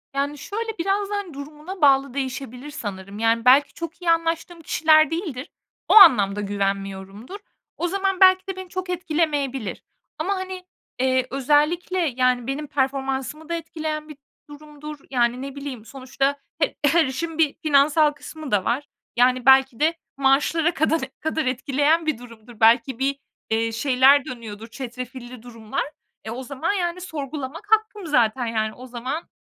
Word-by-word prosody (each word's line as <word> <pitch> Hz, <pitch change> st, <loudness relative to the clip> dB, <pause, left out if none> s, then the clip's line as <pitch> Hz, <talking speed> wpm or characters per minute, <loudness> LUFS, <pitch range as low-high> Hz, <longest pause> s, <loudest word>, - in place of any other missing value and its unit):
Yani, 285 Hz, +1 st, -1 dB
şöyle 445 Hz, +8 st, -5 dB
biraz 395 Hz, +3 st, 0 dB
da, 415 Hz, -, -2 dB
hani, 400 Hz, -5 st, -4 dB
durumuna 300 Hz, +6 st, -9 dB
bağlı 275 Hz, -2 st, +4 dB
değişebilir 265 Hz, 0 st, -5 dB
sanırım. 200 Hz, -6 st, -7 dB
Yani, 230 Hz, +1 st, +1 dB
belki 275 Hz, +2 st, +5 dB
çok 335 Hz, +2 st, -7 dB
iyi 345 Hz, -1 st, +2 dB
anlaştığım 330 Hz, +1 st, -1 dB
kişiler 310 Hz, -1 st, +4 dB
değildir. 320 Hz, -6 st, -4 dB, 0.4 s
O -, -, +3 dB
anlamda 210 Hz, -, +7 dB
güvenmiyorumdur. 195 Hz, -, -4 dB, 0.4 s
O 350 Hz, -, -1 dB
zaman 385 Hz, +1 st, -1 dB
belki 375 Hz, 0 st, +6 dB
de 385 Hz, -, -4 dB
beni 375 Hz, -1 st, -8 dB
çok 370 Hz, 0 st, -5 dB
etkilemeyebilir. 305 Hz, -, -2 dB, 0.4 s
Ama, 395 Hz, +1 st, 0 dB
hani, 375 Hz, -1 st, -6 dB, 0.3 s
eee, 260 Hz, 0 st, +1 dB
özellikle, 300 Hz, +7 st, +1 dB
yani, 255 Hz, -6 st, +1 dB
benim 285 Hz, +3 st, -3 dB
performansımı 270 Hz, +2 st, -2 dB
da -, -, -1 dB
etkileyen 315 Hz, -2 st, -4 dB
bir 305 Hz, -, -10 dB, 0.3 s
durumdur. 300 Hz, 0 st, -10 dB
Yani, 245 Hz, -1 st, +1 dB
ne 275 Hz, 0 st, -7 dB
bileyim, 275 Hz, -6 st, -7 dB
sonuçta 270 Hz, +2 st, -2 dB, 0.2 s
he -, -, 0 dB
her 320 Hz, +3 st, +4 dB
işin 315 Hz, +5 st, -4 dB
bir 315 Hz, -3 st, +3 dB
finansal 300 Hz, +1 st, +4 dB
kısmı 300 Hz, 0 st, -9 dB
da 200 Hz, -3 st, +2 dB
var. 275 Hz, +5 st, -1 dB, 0.3 s
Yani, 250 Hz, +1 st, +3 dB
belki 265 Hz, -2 st, +5 dB
de 315 Hz, +2 st, +3 dB, 0.2 s
maaşlara 290 Hz, +5 st, +2 dB
kadan 320 Hz, +1 st, +1 dB, 0.2 s
kadar 315 Hz, -1 st, -2 dB
etkileyen 285 Hz, +5 st, +1 dB
bir 310 Hz, -6 st, 0 dB
durumdur. 230 Hz, -1 st, -14 dB
Belki 235 Hz, +3 st, +4 dB
bir, 275 Hz, +1 st, +1 dB, 0.3 s
eee, 225 Hz, +1 st, 0 dB
şeyler 265 Hz, +3 st, +4 dB
dönüyordur, 225 Hz, -3 st, -8 dB
çetrefilli 250 Hz, 0 st, -8 dB
durumlar. 230 Hz, +1 st, -4 dB, 0.4 s
E, 220 Hz, -, -6 dB
o 250 Hz, +3 st, -5 dB
zaman, 280 Hz, +8 st, -2 dB
yani, 360 Hz, -2 st, -2 dB
sorgulamak 300 Hz, -1 st, -6 dB
hakkım 435 Hz, -2 st, +1 dB
zaten, 245 Hz, -3 st, +2 dB
yani, 220 Hz, -1 st, -1 dB
o 255 Hz, -, -11 dB
zaman. 255 Hz, +6 st, -5 dB
280 Hz, 155 wpm, -23 LUFS, 250-325 Hz, 0.4 s, anlamda